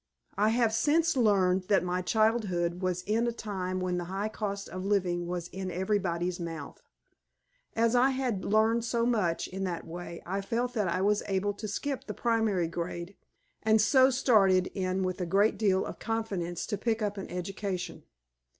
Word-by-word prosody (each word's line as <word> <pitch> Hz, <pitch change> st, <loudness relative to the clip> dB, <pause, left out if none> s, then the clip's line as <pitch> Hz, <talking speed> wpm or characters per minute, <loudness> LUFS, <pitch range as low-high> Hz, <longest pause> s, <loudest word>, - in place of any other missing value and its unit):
I 210 Hz, +2 st, +3 dB
have 230 Hz, -1 st, +2 dB
since 320 Hz, +7 st, +2 dB
learned 190 Hz, -6 st, +3 dB
that 200 Hz, -3 st, +3 dB
my 180 Hz, 0 st, -1 dB
childhood 185 Hz, -4 st, +1 dB
was 180 Hz, -1 st, -1 dB
in 220 Hz, +5 st, +1 dB
a -, -, +1 dB
time 190 Hz, -5 st, -4 dB
when 180 Hz, -1 st, -1 dB
the 175 Hz, -, -4 dB
high 195 Hz, +4 st, -3 dB
cost 200 Hz, -2 st, -4 dB
of 185 Hz, 0 st, -6 dB
living 180 Hz, -3 st, 0 dB
was 175 Hz, -1 st, -3 dB
in 190 Hz, 0 st, -5 dB
everybody's 180 Hz, -1 st, -1 dB
mouth. 165 Hz, -4 st, -6 dB, 0.9 s
As 230 Hz, +1 st, +3 dB
I 250 Hz, +2 st, +5 dB
had 255 Hz, -7 st, -1 dB
learned 220 Hz, +2 st, +2 dB
so 235 Hz, 0 st, 0 dB
much 210 Hz, -9 st, +1 dB
in 190 Hz, +1 st, -5 dB
that 175 Hz, -2 st, -4 dB
way, 170 Hz, 0 st, -8 dB
I 195 Hz, +3 st, -2 dB
felt 240 Hz, +4 st, -2 dB
that 210 Hz, -5 st, 0 dB
I 185 Hz, -, 0 dB
was 205 Hz, +1 st, +2 dB
able 200 Hz, +1 st, 0 dB
to 210 Hz, +2 st, -6 dB
skip 275 Hz, +6 st, -3 dB
the -, -, -5 dB
primary 220 Hz, -7 st, +1 dB
grade, 170 Hz, +2 st, -5 dB, 0.5 s
and 220 Hz, 0 st, +4 dB
so 260 Hz, +4 st, +5 dB
started 195 Hz, -8 st, +3 dB
in 185 Hz, -1 st, -1 dB
with 185 Hz, 0 st, -2 dB
a 180 Hz, -, -2 dB
great 200 Hz, +5 st, +3 dB
deal 195 Hz, -3 st, +2 dB
of -, -, -7 dB
confidence 200 Hz, -7 st, -2 dB
to 205 Hz, -3 st, -3 dB
pick 225 Hz, 0 st, 0 dB
up 205 Hz, -1 st, -2 dB
an 195 Hz, -, -7 dB
education. 180 Hz, -2 st, -4 dB
195 Hz, 180 wpm, -29 LUFS, 180-220 Hz, 0.9 s, I